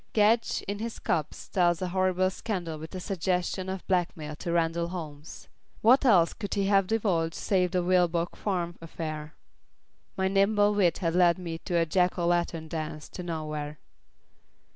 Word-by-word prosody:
Gedge 220 +2 +3
in 200 +1 -3
his 230 +1 -4
cups 155 -3 -2
tells 175 -3 +2
a 185 - -2
horrible 185 0 +1
scandal 175 -7 -4
with 160 +4 -8
a - - -3
suggestion 185 0 -1
of 190 -1 -5
blackmail 165 -5 -1
to 170 - -4
Randall 170 0 +1
Holmes. 155 -4 -8 0.4
What 255 +5 +6
else 180 -9 +5
could 205 - -4
he 200 -1 +1
have 195 -1 +3
divulged 185 -7 0
save 185 -2 +1
the 180 0 0
Vilboek 175 -1 +2
Farm 175 -4 -2
affair? 155 -2 -6 0.8
My 190 0 +1
nimble 205 +2 +3
wit 190 -5 +2
had 165 - +1
led 175 -1 +4
me 170 -3 -5
a 170 -2 +2
Jack 180 +3 +1
o' 175 - 0
Lantern 170 -2 0
dance 155 -2 -5
to - - -7
nowhere. 155 -3 -4
175 Hz, 165 wpm, -28 LUFS, 165-190 Hz, 0.8 s, What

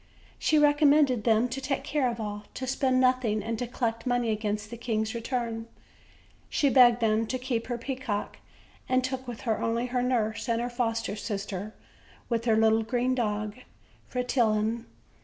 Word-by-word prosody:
She 310 - +3
recommended 290 -4 +4
them 225 +1 +4
to 265 +3 -4
take 275 0 -2
care 285 -4 +1
of 235 -1 -5
all, 210 -1 -5
to 260 - -4
spend 260 0 +1
nothing, 255 -5 +2
and 225 0 -3
to 245 - -2
collect 230 0 -2
money 245 -2 +1
against 210 0 -2
the - - -5
king's 220 -1 -1
return; 230 -1 -3 0.8
she 280 -2 +2
begged 245 -2 +6
them 220 0 +2
to 255 - -2
keep 250 -3 -2
her 240 -1 -2
peacock, 240 -4 -4 0.5
and 255 0 +3
took 260 0 -3
with 240 -2 -6
her 225 -3 -1
only 230 +1 0
her 250 0 -1
nurse 240 -2 0
and 230 0 +2
her 240 +1 -2
foster 230 -3 -1
sister 205 -1 -5 0.5
with 230 -1 -1
her 225 -2 +4
little 220 0 +4
green 245 +3 0
dog, 215 -3 -2 0.5
Fretillon. 230 -2 0
235 Hz, 170 wpm, -28 LUFS, 220-255 Hz, 0.8 s, begged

